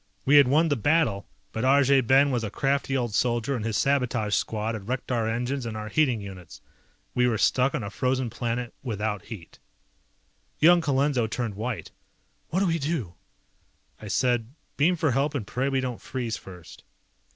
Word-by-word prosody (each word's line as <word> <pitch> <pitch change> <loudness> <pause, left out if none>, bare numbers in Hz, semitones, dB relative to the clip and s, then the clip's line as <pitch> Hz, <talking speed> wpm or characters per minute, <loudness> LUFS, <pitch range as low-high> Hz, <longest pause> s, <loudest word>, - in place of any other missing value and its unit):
We 145 +2 +6
had 140 -3 +7
won 155 +5 +3
the 145 - +2
battle, 135 -6 +1 0.2
but 110 - -3
Arjay 135 0 +5
Ben 135 +3 +4
was 120 -3 -1
a 105 - -2
crafty 135 +4 0
old 120 -4 -2
soldier 120 +3 0
and 115 - -3
his 110 -2 -1
sabotage 125 -6 +1
squad 110 +2 -1
had 105 -3 -7
wrecked 130 +1 -3
our 115 -3 0
engines 125 +4 -2
and 115 -2 -5
our 110 0 -5
heating 130 -4 +2
units. 95 -4 -10 0.5
We 125 0 +3
were 115 -3 +1
stuck 125 +5 +2
on - - -3
a 100 - -5
frozen 130 +1 -1
planet 120 +1 -3
without 105 -4 -3
heat. 95 -8 -10 1.0
Young 170 +2 +6
Colenso 140 -5 +1
turned 115 -1 -3
white. 110 +3 -5 0.6
"What 185 +4 0
do - - +3
we 165 -2 +1
do?" 140 - -2 0.9
I 105 - -8
said, 120 +3 0 0.2
"Beam 165 +5 +3
for 155 -4 +1
help 140 +4 0
and 125 -7 -2
pray 130 +6 -1
we 135 -1 0
don't 125 -2 -4
freeze 120 -4 -3
first." 90 -3 -12
125 Hz, 185 wpm, -26 LUFS, 110-140 Hz, 1.0 s, had